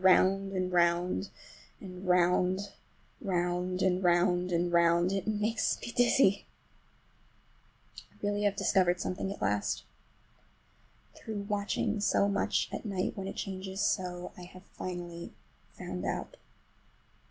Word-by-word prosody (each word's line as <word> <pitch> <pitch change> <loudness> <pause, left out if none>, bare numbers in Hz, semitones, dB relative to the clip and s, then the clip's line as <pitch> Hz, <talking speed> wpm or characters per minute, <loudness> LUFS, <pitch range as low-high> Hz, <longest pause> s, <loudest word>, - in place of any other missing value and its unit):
Round 195 +1 +4
and 185 -1 -1
round 175 +2 +2 0.5
and 185 -1 -9
round—round 180 0 0
and 185 0 +2
round 180 +1 +3
and 175 0 0
round—it 170 +3 +3
makes 215 +1 0
me 235 - -6
dizzy! 240 -4 +4 1.6
I - - -27
really 205 0 0
have 205 -1 +2
discovered 180 -3 +2
something 190 +1 -3
at 200 - -6
last. 105 0 0 1.3
Through 215 -2 -6
watching 205 +1 -1
so 200 0 +3
much 200 0 +1
at - - -4
night, 195 -4 -2
when 195 -1 -5
it - - -5
changes 190 0 -5
so, 180 -3 -1
I 180 - -10
have 185 +1 -14
finally 175 -2 -6 0.4
found - - -5
out. - - -3
185 Hz, 120 wpm, -31 LUFS, 180-200 Hz, 1.6 s, Round